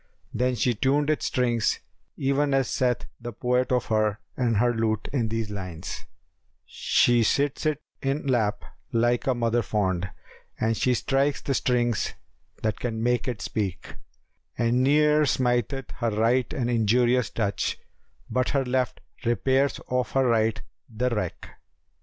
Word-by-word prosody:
Then 125 0 +1
she 120 +2 +1
tuned 140 +6 +2
its 155 - -1
strings, 120 -3 +1 0.4
even 140 +1 +1
as 135 -2 +2
saith 125 -2 0
the 120 0 -6
poet 125 +4 0
of 125 -2 +2
her 110 -1 +1 0.2
and 120 -4 +1
her 120 +3 +3
lute 110 -1 -1
in 120 -6 0
these 115 -2 -2
lines, 90 -5 -6 0.6
"She 120 -1 +3
sits 140 +6 +1
it 155 -1 -1 0.2
in 135 +2 -1
lap 115 -6 +1 0.3
like 120 +2 +1
a 130 - +3
mother 120 0 +1
fond 95 -4 -1 0.3
* - - -29
And 115 +1 +1
she 125 +2 +2
strikes 135 +3 +1
the 140 - 0
strings 120 -3 0 0.5
that 110 -2 -1
can 115 -2 -3
make 120 +1 +1
it 115 -5 -3
speak: 100 -6 -4 0.6
And 120 +2 +2
ne'er 150 +2 +4
smiteth 125 -2 0
her 120 -1 0
right 115 +4 +1
an 120 - -1
injurious 120 +2 +2
touch 100 -4 -1 0.3
* - - -38
But 125 0 0
her 135 -2 +1
left 125 0 -1 0.2
repairs 130 +4 +1
of 125 0 -1
her 135 -1 +3
right 110 -2 +2 0.3
the 125 +3 -1
wreak. 105 -7 -3
120 Hz, 155 wpm, -26 LUFS, 110-130 Hz, 0.6 s, ne'er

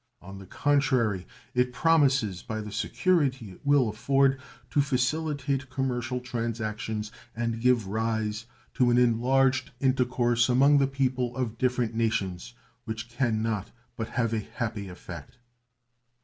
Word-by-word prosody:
On 95 +2 -10
the 95 - -12
contrary, 130 -10 +1 0.3
it 125 0 +2
promises, 135 - +2
by 110 -1 -5
the 105 -1 -6
security 130 - 0
it 90 - -15
will 140 -4 +4
afford, 135 +5 +2 0.3
to 145 - +3
facilitate 140 0 -1
commercial 130 -1 -2
transactions 110 -3 -3 0.2
and 115 0 -2
give 125 -3 +3
rise 110 +1 -2 0.3
to 125 -1 +3
an 120 - +3
enlarged 130 +2 +3
intercourse 125 -2 +2
among 140 +3 +5
the 135 - +3
people 130 -2 -1
of 120 -3 -3
different 125 -3 +1
nations, 110 -3 -2 0.3
which 110 +1 -5
can 120 -3 0
not 110 -3 -2 0.3
but 115 - -4
have 115 -3 -1
a 110 - +1
happy 110 -2 -5
effect. 90 - -10
120 Hz, 135 wpm, -27 LUFS, 110-130 Hz, 0.3 s, among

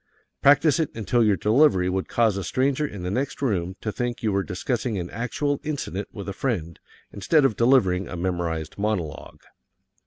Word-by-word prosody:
Practise 145 +3 +5
it 160 - +1
until 115 +2 +1
your 105 -2 +4
delivery 105 - +3
would 95 +1 -1
cause 115 -4 +2
a 100 - -3
stranger 135 - 0
in 100 -8 -8
the 90 - -2
next 130 +6 -2
room 95 -9 -1
to 110 - -2
think 120 +1 -4
you 110 - +1
were 100 0 +1
discussing 110 +5 -2
an 90 -1 -5
actual 140 +4 -2
incident 145 -10 -4
with 100 -2 -8
a 100 - -3
friend, 90 -9 -3 0.3
instead 140 - +2
of 115 - +2
delivering 100 -7 +3
a 90 - -6
memorized 85 -2 -3
monologue. 100 -7 -3
105 Hz, 180 wpm, -24 LUFS, 90-130 Hz, 0.3 s, Practise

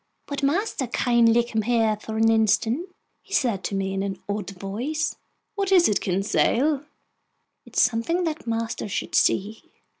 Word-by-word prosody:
"Would 285 -1 -3
master 285 - 0
kindly 235 -1 +3
come 230 -2 -2
here 225 -1 +2
for 220 +1 -7
an 225 0 +4
instant?" 225 - +1 0.3
he 395 - -5
said 230 - +1
to 200 - -2
me 195 0 -1
in 195 - -2
an 195 -1 -3
odd 205 -2 -3
voice. 215 - -3 0.4
"What 395 -1 -2
is 360 -3 +6
it, 210 - +1
Conseil?" 235 - +1 0.8
"It's - - +2
something 250 +10 +1
that 320 -5 -4
master 230 -1 -2
should 200 - -4
see." 215 +3 +2
230 Hz, 155 wpm, -24 LUFS, 205-285 Hz, 0.8 s, is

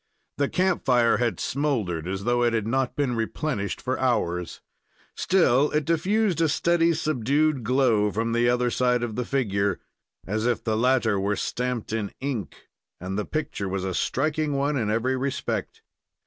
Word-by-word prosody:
The 140 - +2
camp 185 -1 +1
fire 120 -2 +3
had 120 -2 -1
smoldered 110 - -1
as 95 +1 -3
though 120 +2 +1
it 120 -1 +2
had 110 -2 0
not 130 +2 0
been 135 -4 0
replenished 115 -1 -2
for 130 -1 -2
hours. 90 -10 -1 0.6
Still 150 -7 +3
it 150 -1 +1
diffused 180 +3 +1
a 160 - +3
steady, 170 +2 +2
subdued 150 -1 +1
glow, 115 -4 +2
from 115 +2 -1
the 120 +1 +3
other 125 0 +1
side 125 -1 +1
of 115 -3 -3
the 125 - -2
figure, 100 -8 0 0.5
as 110 +5 -1
if 120 - 0
the 110 -2 0
latter 120 -3 +2
were 100 +2 0
stamped 125 -2 -3
in 105 -3 -2
ink, 130 -6 -5 0.3
and 95 +2 -5
the 105 0 -2
picture 150 -10 -3
was 95 0 -2
a 95 - -2
striking 155 - 0
one 140 +2 0
in 115 -6 0
every 115 +4 +1
respect. 135 +1 -3
125 Hz, 170 wpm, -25 LUFS, 110-145 Hz, 0.6 s, fire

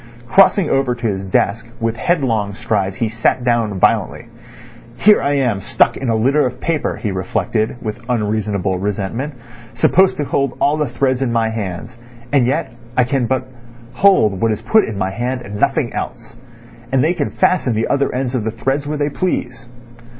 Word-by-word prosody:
Crossing 195 - +5
over 135 -3 +1
to 120 - -7
his 100 -3 -1
desk 105 +4 0
with 115 -1 -1
headlong 115 - 0
strides, 100 -2 -1
he 115 - -1
sat 115 +3 0
down 115 -5 0
violently. - - +1 0.7
"Here 210 0 +5
I 140 - +1
am 125 -8 +1
stuck - - +2
in 130 - -3
a 115 - +2
litter 135 +7 +2
of 125 -1 -3
paper," 165 -3 -1
he 105 - -3
reflected, 110 +5 -1
with 110 +1 -4
unreasonable 105 -5 -1
resentment, 105 +8 -3 0.4
"supposed 190 0 +3
to 150 - -1
hold 140 0 -1
all 145 - +3
the 150 -3 -1
threads 130 +1 0
in 130 -3 0
my 115 -1 +1
hands, 110 +2 -5 0.3
and 130 -4 +4
yet 145 -2 -1 0.2
I 125 - +5
can 125 0 0
but 130 0 -1 0.5
hold 110 - +3
what 115 -1 +2
is 105 - -3
put 220 -1 +4
in 105 - -5
my 95 -1 -1
hand, 125 +4 -3
and 105 0 -7
nothing - - +1
else. - - -6 0.6
And 135 -1 +3
they 165 +3 +2
can - - -2
fasten 130 -10 +1
the 110 - 0
other 140 0 +1
ends 125 0 -2
of 125 -4 -1
the 110 - -1
threads 135 +6 -2
where 150 0 -2
they 145 0 0
please." 125 -8 -3
120 Hz, 185 wpm, -18 LUFS, 110-140 Hz, 0.7 s, Crossing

